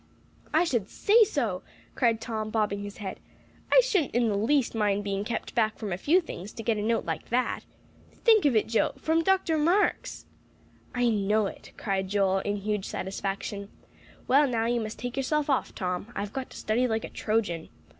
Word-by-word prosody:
"I 315 Hz, +3 st, +4 dB
should 235 Hz, -, -1 dB
say 445 Hz, +3 st, +5 dB
so!" 235 Hz, -, -1 dB, 0.3 s
cried 230 Hz, -3 st, +2 dB
Tom, 220 Hz, -2 st, -4 dB
bobbing 210 Hz, -2 st, 0 dB
his 205 Hz, 0 st, -7 dB
head. 195 Hz, -3 st, -6 dB, 0.5 s
"I -, -, +8 dB
shouldn't 390 Hz, -, 0 dB
in 240 Hz, -2 st, +3 dB
the 205 Hz, -, 0 dB
least 240 Hz, +6 st, +2 dB
mind 205 Hz, -2 st, +1 dB
being 200 Hz, 0 st, -2 dB
kept 230 Hz, +2 st, -4 dB
back 220 Hz, -2 st, +1 dB
from 210 Hz, -5 st, -4 dB
a -, -, -2 dB
few 325 Hz, -, +4 dB
things, 210 Hz, -, -8 dB
to 225 Hz, -, -7 dB
get 225 Hz, -1 st, +1 dB
a -, -, -2 dB
note 225 Hz, +2 st, 0 dB
like -, -, -4 dB
that. 250 Hz, +2 st, 0 dB, 0.5 s
Think 445 Hz, -6 st, +4 dB
of 275 Hz, -5 st, +4 dB
it, 215 Hz, -, +3 dB
Joe, 225 Hz, 0 st, +1 dB
from 320 Hz, +1 st, +1 dB
Dr. 370 Hz, -4 st, +2 dB
Marks!" 355 Hz, +7 st, +1 dB, 0.7 s
"I 245 Hz, 0 st, +2 dB
know 210 Hz, 0 st, +2 dB
it," -, -, -8 dB
cried 190 Hz, -2 st, -1 dB
Joel, 195 Hz, -1 st, +2 dB
in 205 Hz, +1 st, -2 dB
huge 210 Hz, 0 st, -2 dB
satisfaction. 195 Hz, +1 st, -4 dB, 0.6 s
"Well, 280 Hz, +3 st, +5 dB
now, 230 Hz, -3 st, 0 dB
you 235 Hz, 0 st, +1 dB
must 215 Hz, 0 st, -5 dB
take 245 Hz, 0 st, -5 dB
yourself 290 Hz, +2 st, 0 dB
off, 265 Hz, -, 0 dB
Tom; 180 Hz, +3 st, -3 dB
I've 205 Hz, 0 st, -4 dB
got 265 Hz, -1 st, -4 dB
to -, -, -11 dB
study 240 Hz, +4 st, +1 dB
like 225 Hz, -2 st, -1 dB
a -, -, -5 dB
Trojan." 205 Hz, -7 st, -1 dB
225 Hz, 195 wpm, -28 LUFS, 205-265 Hz, 0.7 s, I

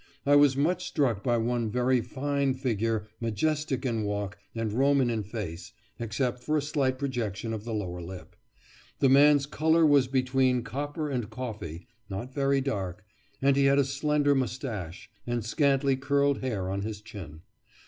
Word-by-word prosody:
I 145 Hz, +1 st, +5 dB
was 145 Hz, -2 st, +5 dB
much 180 Hz, +5 st, +1 dB
struck 125 Hz, -, 0 dB
by 120 Hz, -1 st, +2 dB
one 115 Hz, 0 st, 0 dB
very 125 Hz, +2 st, +2 dB
fine 140 Hz, +2 st, -1 dB
figure, 115 Hz, -4 st, -1 dB
majestic 135 Hz, +4 st, -1 dB
in 115 Hz, -3 st, 0 dB
walk, 105 Hz, -1 st, -3 dB, 0.2 s
and 115 Hz, -2 st, -2 dB
Roman 135 Hz, 0 st, +3 dB
in 110 Hz, -2 st, -1 dB
face, 95 Hz, -5 st, -6 dB, 0.3 s
except 120 Hz, +2 st, -2 dB
for 155 Hz, 0 st, +1 dB
a -, -, +1 dB
slight 140 Hz, -4 st, 0 dB
projection 115 Hz, -5 st, -3 dB
of 110 Hz, -1 st, -5 dB
the 115 Hz, -, -4 dB
lower 90 Hz, -4 st, -4 dB
lip. 90 Hz, +1 st, -9 dB, 0.6 s
The 135 Hz, -, +3 dB
man's 145 Hz, +1 st, +6 dB
colour 160 Hz, +3 st, +3 dB
was 145 Hz, -4 st, +5 dB
between 130 Hz, -1 st, +2 dB
copper 145 Hz, +4 st, -4 dB
and 120 Hz, -5 st, -2 dB
coffee, 105 Hz, -10 st, -6 dB, 0.2 s
not 105 Hz, +7 st, -5 dB
very 140 Hz, 0 st, +2 dB
dark, 95 Hz, -9 st, -3 dB, 0.4 s
and 140 Hz, 0 st, +4 dB
he 140 Hz, 0 st, +3 dB
had 135 Hz, 0 st, +4 dB
a 140 Hz, -, +4 dB
slender 145 Hz, +1 st, +1 dB
moustache, 120 Hz, -, -3 dB, 0.2 s
and 120 Hz, -2 st, -2 dB
scanty 135 Hz, +2 st, +2 dB
curled 140 Hz, +1 st, +1 dB
hair 110 Hz, -8 st, -2 dB
on 100 Hz, +1 st, -2 dB
his 105 Hz, 0 st, -4 dB
chin. 100 Hz, -8 st, -10 dB
130 Hz, 165 wpm, -28 LUFS, 110-140 Hz, 0.6 s, man's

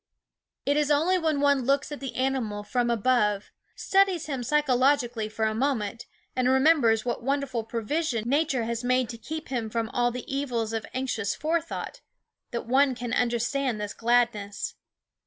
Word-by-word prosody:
It 285 Hz, +1 st, +2 dB
is 300 Hz, -1 st, +2 dB
only 325 Hz, +6 st, +3 dB
when 315 Hz, -4 st, 0 dB
one 285 Hz, -1 st, +4 dB
looks 275 Hz, +4 st, +1 dB
at 295 Hz, -, -5 dB
the 270 Hz, -2 st, -6 dB
animal 255 Hz, -6 st, -1 dB
from 240 Hz, +3 st, 0 dB
above, 210 Hz, -3 st, +1 dB, 0.2 s
studies 385 Hz, -4 st, +2 dB
him 270 Hz, -4 st, -3 dB
psychologically 255 Hz, -4 st, +2 dB
for 220 Hz, 0 st, -1 dB
a 220 Hz, -, +1 dB
moment, 230 Hz, -3 st, -1 dB, 0.3 s
and 255 Hz, 0 st, +2 dB
remembers 265 Hz, -5 st, +4 dB
what 245 Hz, -, -2 dB
wonderful 270 Hz, -2 st, -1 dB
provision 230 Hz, +2 st, -2 dB
Nature 275 Hz, -2 st, +1 dB
has 235 Hz, +1 st, -3 dB
made 255 Hz, -1 st, +1 dB
to 235 Hz, -, -6 dB
keep 315 Hz, +5 st, -6 dB
him 240 Hz, -4 st, -2 dB
from 225 Hz, 0 st, -2 dB
all 240 Hz, 0 st, +1 dB
the 245 Hz, 0 st, -6 dB
evils 245 Hz, -5 st, -2 dB
of 225 Hz, -1 st, -3 dB
anxious 245 Hz, -6 st, -1 dB
forethought, 330 Hz, +2 st, -3 dB, 0.5 s
that 235 Hz, -, -4 dB
one 265 Hz, +2 st, +3 dB
can 240 Hz, -1 st, -4 dB
understand 240 Hz, 0 st, 0 dB
this 210 Hz, -1 st, -4 dB
gladness. 230 Hz, -4 st, 0 dB
250 Hz, 160 wpm, -27 LUFS, 230-280 Hz, 0.5 s, one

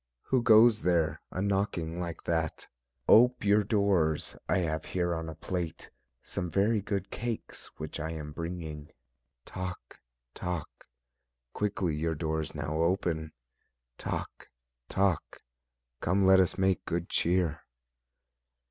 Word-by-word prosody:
Who 130 Hz, -2 st, +3 dB
goes 110 Hz, -1 st, +6 dB
there 85 Hz, -4 st, +1 dB
a 95 Hz, -, -3 dB
knocking 95 Hz, -4 st, -1 dB
like 85 Hz, -2 st, -5 dB
that? 80 Hz, -2 st, -1 dB, 0.4 s
Ope 125 Hz, 0 st, +6 dB
your 105 Hz, +1 st, +5 dB
doors, 100 Hz, -7 st, +1 dB
I -, -, +3 dB
have 80 Hz, -3 st, -1 dB
here 85 Hz, -1 st, -1 dB
on 80 Hz, 0 st, -4 dB
a 80 Hz, -, -7 dB
plate 85 Hz, -3 st, -4 dB, 0.3 s
Some 90 Hz, -, -3 dB
very 105 Hz, +4 st, +2 dB
good 100 Hz, -1 st, -3 dB
cakes 120 Hz, -1 st, -4 dB
which -, -, -5 dB
I 80 Hz, -, -3 dB
am 75 Hz, -2 st, -6 dB
bringing: 80 Hz, -2 st, -6 dB, 0.6 s
Toc! 90 Hz, -1 st, -7 dB, 0.3 s
Toc! 90 Hz, -4 st, -5 dB, 0.7 s
quickly 95 Hz, -6 st, -1 dB
your 80 Hz, +1 st, -1 dB
doors 80 Hz, 0 st, -2 dB
now 75 Hz, +2 st, -2 dB
open; 85 Hz, -2 st, 0 dB, 0.7 s
Toc! -, -, -5 dB, 0.4 s
Toc! 95 Hz, -4 st, 0 dB, 0.6 s
come 95 Hz, +3 st, +2 dB
let 95 Hz, 0 st, +7 dB
us 95 Hz, -1 st, +2 dB
make 95 Hz, -1 st, +2 dB
good 85 Hz, +1 st, -2 dB
cheer. 85 Hz, -3 st, +1 dB
90 Hz, 125 wpm, -30 LUFS, 80-100 Hz, 0.7 s, let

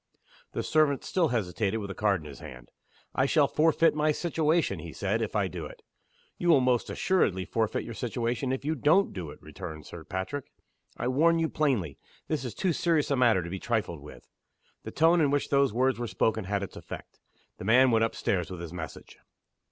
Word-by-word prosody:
The -, -, -2 dB
servant 155 Hz, -3 st, +2 dB
still 175 Hz, -3 st, +1 dB
hesitated 110 Hz, -, -1 dB
with 100 Hz, -2 st, -5 dB
the -, -, -4 dB
card 100 Hz, -4 st, +1 dB
in -, -, -12 dB
his 70 Hz, -, -10 dB
hand. 60 Hz, -1 st, -11 dB, 0.4 s
"I 130 Hz, -, +2 dB
shall 145 Hz, -1 st, +4 dB
forfeit 165 Hz, +2 st, +3 dB
my 150 Hz, 0 st, +2 dB
situation," 165 Hz, +1 st, 0 dB
he -, -, -8 dB
said, -, -, -1 dB
"if -, -, -3 dB
I -, -, +2 dB
do -, -, -6 dB
it." -, -, -14 dB, 0.6 s
"You 175 Hz, -, 0 dB
will 155 Hz, -5 st, +7 dB
most 125 Hz, -2 st, +1 dB
assuredly 95 Hz, -, +1 dB
forfeit 110 Hz, +3 st, -1 dB
your 115 Hz, -, -7 dB
situation 120 Hz, +2 st, -2 dB
if 130 Hz, +1 st, -3 dB
you 155 Hz, -, +1 dB
don't 165 Hz, +6 st, +3 dB
do 90 Hz, -5 st, -5 dB
it," -, -, -11 dB
returned 80 Hz, -1 st, -8 dB
Sir 85 Hz, -, -9 dB
Patrick. 95 Hz, -, -5 dB, 0.5 s
"I -, -, -2 dB
warn 160 Hz, +6 st, +3 dB
you 165 Hz, -1 st, +1 dB
plainly, 120 Hz, -, 0 dB, 0.3 s
this 155 Hz, -4 st, -1 dB
is 125 Hz, -, -5 dB
too 185 Hz, -3 st, 0 dB
serious 160 Hz, -2 st, +1 dB
a -, -, +3 dB
matter 115 Hz, -8 st, +3 dB
to 85 Hz, -, -6 dB
be 95 Hz, -, -4 dB
trifled 105 Hz, -8 st, -2 dB
with." 75 Hz, -, -13 dB, 0.6 s
The -, -, -4 dB
tone 165 Hz, +2 st, +4 dB
in 145 Hz, -, +3 dB
which 145 Hz, 0 st, 0 dB
those 140 Hz, -2 st, +3 dB
words 130 Hz, +2 st, +1 dB
were 120 Hz, -, -2 dB
spoken 110 Hz, -2 st, 0 dB
had 100 Hz, +1 st, -1 dB
its 100 Hz, -, -7 dB
effect. -, -, -9 dB, 0.4 s
The -, -, -6 dB
man 125 Hz, +4 st, +5 dB
went 115 Hz, -1 st, +3 dB
up 115 Hz, -, -1 dB
stairs 90 Hz, -4 st, -1 dB
with 90 Hz, -2 st, -7 dB
his 85 Hz, -1 st, -7 dB
message. 80 Hz, -3 st, -8 dB
125 Hz, 210 wpm, -28 LUFS, 100-155 Hz, 0.6 s, will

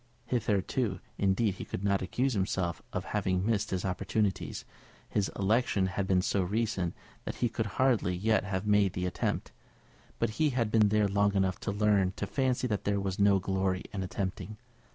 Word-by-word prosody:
Hitherto, 105 Hz, -2 st, 0 dB, 0.2 s
indeed, 100 Hz, +2 st, +2 dB
he 95 Hz, -, -7 dB
could 95 Hz, -, -5 dB
not 100 Hz, -1 st, +2 dB
accuse 125 Hz, +8 st, 0 dB
himself 95 Hz, -4 st, -1 dB
of -, -, -3 dB
having 95 Hz, 0 st, 0 dB
missed 110 Hz, -2 st, +1 dB
his 95 Hz, 0 st, -2 dB
opportunities; 95 Hz, +2 st, -1 dB, 0.4 s
his 100 Hz, -2 st, 0 dB
election 100 Hz, -1 st, +2 dB
had 95 Hz, +1 st, -2 dB
been 90 Hz, -1 st, +3 dB
so 100 Hz, -, +1 dB
recent 100 Hz, -2 st, -1 dB, 0.3 s
that -, -, -4 dB
he 120 Hz, -, 0 dB
could 110 Hz, 0 st, -2 dB
hardly 120 Hz, -9 st, +2 dB
yet 110 Hz, +4 st, +2 dB
have 100 Hz, 0 st, -3 dB
made 105 Hz, -2 st, +3 dB
the 90 Hz, -1 st, -2 dB
attempt. 90 Hz, -, -2 dB, 0.7 s
But 115 Hz, -2 st, 0 dB
he 155 Hz, -, +5 dB
had 120 Hz, -5 st, 0 dB
been 110 Hz, -2 st, +5 dB
there 105 Hz, 0 st, +3 dB
long 100 Hz, +1 st, +2 dB
enough 95 Hz, -2 st, +1 dB
to 100 Hz, -, -2 dB
learn 100 Hz, -2 st, +2 dB
to -, -, -3 dB
fancy 130 Hz, -2 st, 0 dB
that 105 Hz, -5 st, -1 dB
there 100 Hz, 0 st, +1 dB
was 95 Hz, -1 st, -3 dB
no 100 Hz, -1 st, +5 dB
glory 95 Hz, 0 st, -1 dB
in 100 Hz, -, -2 dB
attempting. 95 Hz, +3 st, -4 dB
100 Hz, 180 wpm, -30 LUFS, 95-110 Hz, 0.7 s, he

